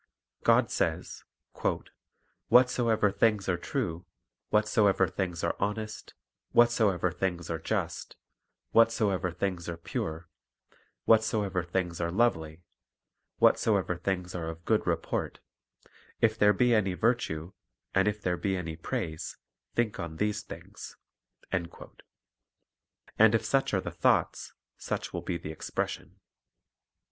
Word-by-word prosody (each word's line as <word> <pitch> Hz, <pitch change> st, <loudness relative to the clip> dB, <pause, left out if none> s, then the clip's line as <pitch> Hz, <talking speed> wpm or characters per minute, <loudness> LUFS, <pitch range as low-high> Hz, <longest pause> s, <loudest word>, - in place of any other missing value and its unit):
God -, -, +4 dB
says: -, -, -2 dB, 1.2 s
"Whatsoever 120 Hz, -4 st, +4 dB
things 105 Hz, -1 st, +2 dB
are 95 Hz, -, +2 dB
true, 90 Hz, -, -3 dB, 0.4 s
whatsoever 105 Hz, -2 st, +3 dB
things 90 Hz, -2 st, -3 dB
are 85 Hz, -, 0 dB
honest, 110 Hz, +1 st, -4 dB, 0.4 s
whatsoever 110 Hz, -7 st, +3 dB
things 85 Hz, -1 st, -3 dB
are 80 Hz, -, -2 dB
just, 80 Hz, -, -3 dB, 0.6 s
whatsoever 110 Hz, -5 st, +3 dB
things 90 Hz, -1 st, -3 dB
are 85 Hz, -, -4 dB
pure, 80 Hz, 0 st, -4 dB, 0.8 s
whatsoever 110 Hz, -4 st, +3 dB
things 90 Hz, -1 st, -2 dB
are 85 Hz, -, 0 dB
lovely, 85 Hz, -6 st, 0 dB, 0.7 s
whatsoever 90 Hz, -, +3 dB
things 90 Hz, 0 st, -3 dB
are 85 Hz, -2 st, -4 dB
of 80 Hz, +1 st, -9 dB
good -, -, +1 dB
report; -, -, -2 dB, 0.8 s
if 110 Hz, -1 st, +3 dB
there 105 Hz, -2 st, +5 dB
be 120 Hz, +4 st, +3 dB
any 95 Hz, -5 st, +2 dB
virtue, 95 Hz, -8 st, 0 dB, 0.4 s
and 95 Hz, +2 st, +3 dB
if 105 Hz, 0 st, -1 dB
there 90 Hz, -1 st, 0 dB
be 95 Hz, 0 st, -1 dB
any 80 Hz, -3 st, -4 dB
praise, 80 Hz, 0 st, -4 dB, 0.4 s
think 115 Hz, -4 st, 0 dB
on 85 Hz, -3 st, -5 dB
these 105 Hz, +4 st, -1 dB
things." 105 Hz, -, -10 dB, 0.5 s
1 85 Hz, -2 st, -1 dB, 1.5 s
And 110 Hz, 0 st, +7 dB
if 115 Hz, -, 0 dB
such 135 Hz, -1 st, +1 dB
are -, -, +1 dB
the -, -, -5 dB
thoughts, -, -, +1 dB, 0.3 s
such -, -, -4 dB
will -, -, -3 dB
be 85 Hz, -, -3 dB
the 80 Hz, -2 st, -7 dB
expression. 80 Hz, -, -4 dB
95 Hz, 120 wpm, -29 LUFS, 85-110 Hz, 1.5 s, And